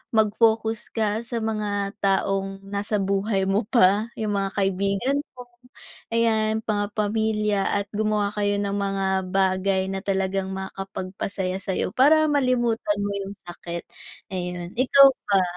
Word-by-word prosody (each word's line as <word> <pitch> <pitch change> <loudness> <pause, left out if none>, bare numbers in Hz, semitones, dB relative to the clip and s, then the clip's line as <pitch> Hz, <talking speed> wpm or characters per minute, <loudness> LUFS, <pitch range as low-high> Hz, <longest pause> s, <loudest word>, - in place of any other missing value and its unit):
mag-focus 220 +1 +2
ka 215 -1 0
sa 235 0 -5
mga 205 -2 -2
taong 195 0 0
nasa 200 +1 -2
buhay 195 0 0
mo 200 +2 0
pa, 210 -2 +4
yung 215 -2 -1
mga 195 - -1
kaibigan 200 +7 0 0.2
mo. 250 - -8 0.7
Ayan, 220 -1 +2
mga 205 -2 0
pamilya 210 -1 0
at 200 0 0
gumawa 210 -1 0
kayo 205 -1 0
ng 200 -1 -2
mga 195 -1 -1 0.3
bagay 190 0 +1
na 195 - -2
talagang 190 -1 -1
makapagpasaya 190 0 -4
sa'yo 190 -2 -2
para 310 +6 +5
malimutan 240 -6 +1
mo 205 - -1
yung 200 +1 -8
sakit. 175 -2 -8 0.5
Ayun, 180 -1 -4
ikaw 275 +2 +7 0.2
ba? 195 -2 +4
205 Hz, 130 wpm, -24 LUFS, 195-220 Hz, 0.7 s, ikaw